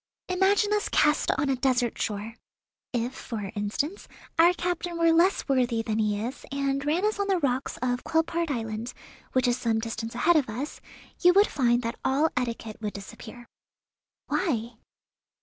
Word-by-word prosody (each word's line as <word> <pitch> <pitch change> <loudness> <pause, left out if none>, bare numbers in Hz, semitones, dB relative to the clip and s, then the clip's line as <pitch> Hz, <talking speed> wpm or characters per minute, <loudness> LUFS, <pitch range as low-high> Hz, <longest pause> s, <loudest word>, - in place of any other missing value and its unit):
Imagine 395 +3 +3
us 420 +1 0
cast 300 0 +3
on 285 - +1
a 270 - +2
desert 250 -2 +1
shore. 210 +1 -3 0.6
If, 245 +1 -1
for 210 -7 -6
instance, 220 - -3 0.3
our 340 +2 +8
captain 350 -1 -3
were 335 0 +4
less 350 +4 +3
worthy 245 -4 +1
than 220 -1 -1
he 210 -1 +1
is, 255 +3 -6
and 275 0 -1
ran 320 +7 +1
us 425 -1 0
on 400 - 0
the 385 -2 +2
rocks 265 -4 -1
of 245 0 0
Quelpaerd 330 +1 0
Island, 225 -2 -3 0.4
which 255 -1 +3
is 245 0 +2
some 225 -2 +1
distance 225 0 -4
ahead 335 +7 +4
of 275 -6 +1
us, 255 +8 -5 0.4
you 355 0 +6
would 400 +2 +6
find 245 - +1
that 230 +1 -4
all 285 +5 +2
etiquette 230 -3 -3
would 210 -1 -3
disappear." 220 +4 -10 0.8
"Why?" 235 - -1
255 Hz, 165 wpm, -27 LUFS, 230-330 Hz, 0.8 s, our